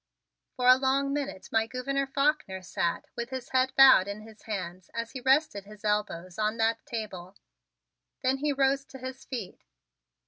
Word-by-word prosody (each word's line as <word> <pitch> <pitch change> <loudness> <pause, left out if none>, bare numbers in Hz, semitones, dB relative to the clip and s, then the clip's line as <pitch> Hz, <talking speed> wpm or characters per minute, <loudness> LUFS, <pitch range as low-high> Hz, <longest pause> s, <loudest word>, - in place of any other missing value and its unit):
For 250 - -2
a 255 0 +9
long 275 +1 +1
minute 285 -9 -4
my 225 0 +2
Gouverneur 275 +3 -2
Faulkner 275 -9 0
sat 170 -1 -2
with 235 0 -4
his 260 -1 -6
head 260 0 +2
bowed 265 -8 +8
in 200 +1 -5
his 220 0 -14
hands 185 -4 -6
as 230 0 -3
he 260 - -7
rested 265 -6 +2
his 210 +1 -13
elbows 210 -3 -1
on 215 +1 0
that 225 0 +1
table, 200 -7 -6 0.9
then 260 +1 +2
he 295 +2 0
rose 275 0 +2
to 270 - -11
his 260 +1 -8
feet. 235 -8 -6
240 Hz, 170 wpm, -28 LUFS, 210-270 Hz, 0.9 s, a